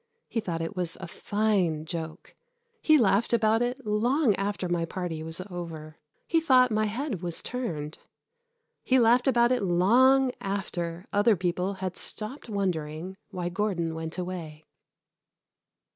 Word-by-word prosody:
He 235 - -2
thought 170 -6 -3
it 165 +5 -5
was 180 -2 0
a 185 - -6
fine 190 -6 0
joke. 160 -1 -6 0.5
He 310 -1 +5
laughed 225 -1 +2
about 225 0 +3
it 245 +1 -2
long 235 +4 +2
after 195 -1 -2
my 175 -1 0
party 165 -2 -4
was 160 +2 -2
over. 165 -4 -8 0.3
He 330 -1 +2
thought 255 -5 +5
my 215 0 +2
head 220 - -3
was 175 -2 -1
turned. 165 -12 -4 0.8
He 260 - +3
laughed 245 +2 +4
about 240 -2 +4
it 250 - +2
long 250 +9 +4
after 175 -3 -3
other 205 +2 +4
people 180 +2 -1
had 185 -1 -4
stopped 235 +4 -3
wondering 180 -3 -3
why 180 -3 -3
Gordon 175 -4 -1
went 160 +1 -5
away. 170 -4 -6
195 Hz, 145 wpm, -27 LUFS, 170-230 Hz, 0.8 s, He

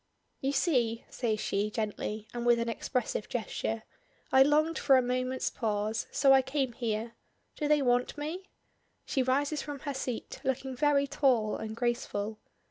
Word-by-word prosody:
"You 270 - 0
see," 245 -7 +1
says 220 -4 -1
she 205 +1 0
gently, 215 0 -3
and 240 -1 -3
with 240 0 +5
an 235 0 -1
expressive 230 -2 -2
gesture, 225 -1 -2 0.5
"I 265 - +6
longed 305 +4 +4
for 275 -2 +5
a - - +5
moment's 255 +1 -1
pause, 215 -1 -1
so 270 -1 +5
I 265 - +7
came 265 -1 -1
here. 225 -1 -2 0.4
Do 300 - -1
they 295 -1 +4
want 245 +2 +1
me?" 330 +6 -5 0.6
She 265 - 0
rises 280 +3 +1
from 285 -2 -6
her 285 -2 -3
seat, 255 -3 -5
looking 265 0 -2
very 285 +1 +3
tall 260 -7 +2
and 220 0 -5
graceful. 225 -3 -2
255 Hz, 160 wpm, -30 LUFS, 225-280 Hz, 0.6 s, I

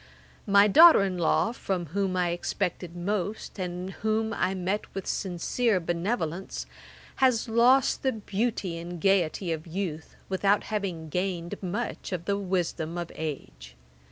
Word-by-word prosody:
My 200 0 +6
daughter 320 - +8
in 185 -2 -2
law, 175 +6 +2
from 190 -7 -3
whom 195 -2 0
I 180 -1 +2
expected 175 0 -3
most, 205 +3 -3
and 180 +1 -4
whom 220 +4 -1
I 190 -4 0
met 190 +3 -2
with 195 - -4
sincere 195 +4 0
benevolence, 175 +1 -2 0.5
has 255 -4 +3
lost 240 +4 +4
the 265 -1 +1
beauty 205 -4 -2
and 175 +1 -7
gaiety 185 -2 +1
of 160 +1 -4
youth, 165 -3 -4
without 195 +2 +2
having 185 -7 -3
gained 180 0 -3
much 200 +5 -4
of 175 -2 -3
the 200 0 0
wisdom 175 -3 -2
of 170 -1 -4
age. 65 - -7
190 Hz, 140 wpm, -27 LUFS, 170-205 Hz, 0.5 s, daughter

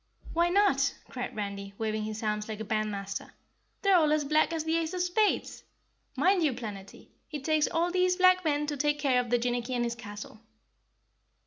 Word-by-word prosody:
"Why 340 +1 +3
not?" 350 -8 +3
cried 250 -1 -5
Randy, 200 -1 -5
waving 215 -1 -2
his 215 +1 -5
arms 210 0 -2
like 215 -1 -5
a - - -3
bandmaster. 205 -2 -3 0.5
"They're 395 -1 +5
all 310 -3 +3
as 305 -1 +2
black 305 +3 +3
as 325 -2 -2
the 320 +1 0
ace 330 +2 -2
of 360 - -1
spades. 380 +4 0 0.5
Mind 380 -1 +3
you, 300 -5 +2
Planetty, 205 -5 -8 0.2
it 295 -3 -6
takes 310 0 +2
all 340 +1 0
these 365 0 +2
black 370 0 +5
men 295 -2 +1
to 295 -1 -3
take 295 +1 +1
care 275 -4 +2
of 245 - -2
Jinnicky 245 +1 0
and 240 - 0
his 235 0 -1
castle." 215 -2 -9
275 Hz, 190 wpm, -29 LUFS, 215-330 Hz, 0.5 s, They're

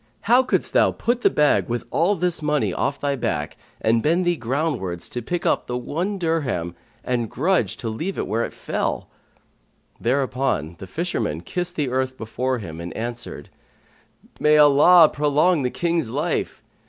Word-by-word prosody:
How 245 +4 +5
couldst 260 - -1
thou - - +5
put 240 +1 -1
the - - +5
bag 150 -4 +2
with 120 0 -2
all 175 +6 +2
this 175 -2 -1
money 150 -1 0
off 140 +1 -1
thy 140 -1 0
back 75 - -2 0.2
and 115 +1 +2
bend 170 +6 +2
thee 175 0 +2
groundwards 120 - -2
to 120 - -4
pick 175 +9 -3
up - - +1
the 125 - -2
one 170 +11 -3
dirham 145 - -1 0.3
and 120 -3 -1
grudge 180 +9 0
to 120 - -5
leave 160 - -3
it - - -1
where 115 +3 -1
it - - -4
fell?" - - -3 0.9
Thereupon 125 - 0
the 95 - -8
fisherman 110 - -2
kissed 175 - -4
the 145 -4 -1
earth 130 0 -1
before 125 +3 -2
him 85 -7 -7
and 85 - -6
answered, 120 -9 -6 0.9
"May 150 0 +4
Allah 150 +4 +7
prolong 150 +3 +2
the 125 - 0
King's 170 -4 -1
life! - - -2
140 Hz, 165 wpm, -22 LUFS, 115-165 Hz, 0.9 s, Allah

